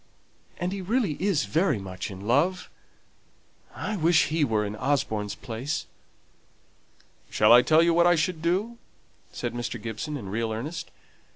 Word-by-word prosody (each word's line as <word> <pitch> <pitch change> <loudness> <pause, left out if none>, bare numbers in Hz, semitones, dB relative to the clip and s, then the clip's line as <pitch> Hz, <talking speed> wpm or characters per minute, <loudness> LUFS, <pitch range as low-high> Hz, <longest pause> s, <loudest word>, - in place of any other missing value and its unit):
And 175 +1 -2
he 195 0 -4
really 210 -2 0
is 185 - +1
very 155 - +1
much 95 -1 -6
in 95 -1 -9
love. 145 - +1 1.0
I 215 - -3
wish 165 -2 +3
he 160 0 +1
were 110 -5 +1
in 105 +1 -5
Osborne's 110 -7 -1
place." 125 +6 -4 1.4
"Shall 105 +2 +5
I 120 - +9
tell 160 +5 +4
you 170 0 +3
what 170 +1 +4
I 175 - +5
should 160 0 -1
do?" 200 +8 -1 0.5
said - - -4
Mr. 120 -1 -4
Gibson, 115 +8 -5
in 100 -8 -7
real 110 +2 -2
earnest. 145 +10 -5
150 Hz, 155 wpm, -26 LUFS, 110-175 Hz, 1.4 s, I